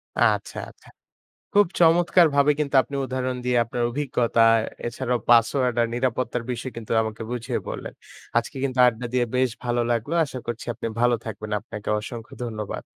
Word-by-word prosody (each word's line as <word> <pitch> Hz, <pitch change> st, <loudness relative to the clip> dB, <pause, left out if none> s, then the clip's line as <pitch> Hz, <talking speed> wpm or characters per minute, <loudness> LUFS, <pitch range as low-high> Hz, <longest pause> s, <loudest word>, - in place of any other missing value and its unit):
আচ্ছা, -, -, +1 dB
আচ্ছা। -, -, -19 dB, 0.6 s
খুব 205 Hz, 0 st, +6 dB
চমৎকারভাবে 165 Hz, -4 st, +5 dB
কিন্তু 145 Hz, -2 st, -1 dB
আপনি 140 Hz, -, -8 dB
উদাহরণ 130 Hz, 0 st, -2 dB
দিয়ে 125 Hz, -1 st, +2 dB
আপনার 120 Hz, +1 st, -3 dB
অভিজ্ঞতা 120 Hz, -3 st, 0 dB, 0.5 s
এছাড়াও 125 Hz, 0 st, -2 dB
পাসওয়ার্ড 120 Hz, +1 st, +4 dB
আর 115 Hz, -, +2 dB
নিরাপত্তার 125 Hz, -1 st, -1 dB
বিষয় 125 Hz, +2 st, -4 dB
কিন্তু 115 Hz, -2 st, -7 dB
আমাকে 110 Hz, +1 st, -6 dB
বুঝিয়ে 125 Hz, 0 st, -2 dB
বললেন। -, -, -6 dB, 0.4 s
আজকে 120 Hz, +5 st, -1 dB
কিন্তু 130 Hz, -2 st, -1 dB
আড্ডা 120 Hz, 0 st, -1 dB
দিয়ে 125 Hz, -1 st, +2 dB
বেশ 130 Hz, 0 st, +3 dB, 0.2 s
ভালো 120 Hz, 0 st, +1 dB
লাগলো। 120 Hz, +6 st, -1 dB
আশা 130 Hz, -3 st, -7 dB
করছি 120 Hz, -1 st, -4 dB
আপনি 115 Hz, -, -5 dB
ভালো 120 Hz, 0 st, +4 dB
থাকবেন 110 Hz, -1 st, -6 dB
আপনাকে 105 Hz, 0 st, -8 dB
অসংখ্য 115 Hz, +1 st, -8 dB
ধন্যবাদ। 110 Hz, -3 st, -5 dB
125 Hz, 155 wpm, -24 LUFS, 115-130 Hz, 0.6 s, খুব